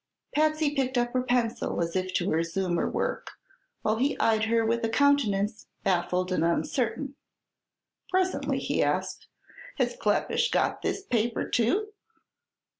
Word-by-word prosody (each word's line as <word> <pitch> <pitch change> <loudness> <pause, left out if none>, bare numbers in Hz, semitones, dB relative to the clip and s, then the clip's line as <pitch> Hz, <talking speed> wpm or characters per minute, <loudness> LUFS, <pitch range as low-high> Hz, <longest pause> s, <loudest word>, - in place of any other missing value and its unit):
Patsy 310 -1 +2
picked 265 -2 0
up 240 0 0
her 255 - +2
pencil 245 -2 0
as 170 0 -2
if 185 0 -1
to 175 - +1
resume 170 +2 0
her - - 0
work, - - -2 0.5
while 215 +1 +1
he 270 +5 +1
eyed 220 -1 +2
her 225 0 +2
with 230 +1 0
a 225 - +1
countenance 225 -6 +2 0.2
baffled 180 -1 0
and 175 -3 +1
uncertain. 255 - -1 1.0
Presently 370 0 0
he - - 0
asked: - - -1 0.5
"Has - - 0
Kleppish 475 -1 +1
got - - 0
this 395 - -2
paper 235 - 0
too?" 360 - +1
230 Hz, 140 wpm, -27 LUFS, 195-285 Hz, 1.0 s, Patsy